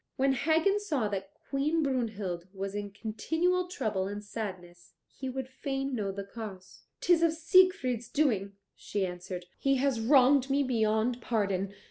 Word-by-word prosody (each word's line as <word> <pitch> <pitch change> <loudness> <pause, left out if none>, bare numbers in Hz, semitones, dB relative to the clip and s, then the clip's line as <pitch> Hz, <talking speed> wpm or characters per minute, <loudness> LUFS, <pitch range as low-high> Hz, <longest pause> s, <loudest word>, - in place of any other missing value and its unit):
When 270 +1 +3
Hagen 325 +9 +2
saw 290 - -1
that 195 -1 -4 0.2
Queen 300 +4 +1
Brunhild 215 -10 -2
was 195 0 -4
in 205 0 -4
continual 320 - -1
trouble 215 - -2
and 205 +1 -5
sadness 185 -5 -7 0.2
he 265 -1 -4
would 260 0 -4
fain 270 0 -3
know 205 -5 -1
the 200 +1 -5
cause. 200 -3 -9 0.2
"'Tis 350 -2 +4
of 335 -1 +4
Siegfried's 330 - +3
doing," 210 -10 +1 0.2
she 200 -2 -2
answered. 180 0 -6
"He 275 0 +2
has 265 -2 +1
wronged 265 +2 +5
me 280 +1 +3
beyond 230 -1 +1
pardon." 200 -4 -1
240 Hz, 150 wpm, -30 LUFS, 200-280 Hz, 0.2 s, wronged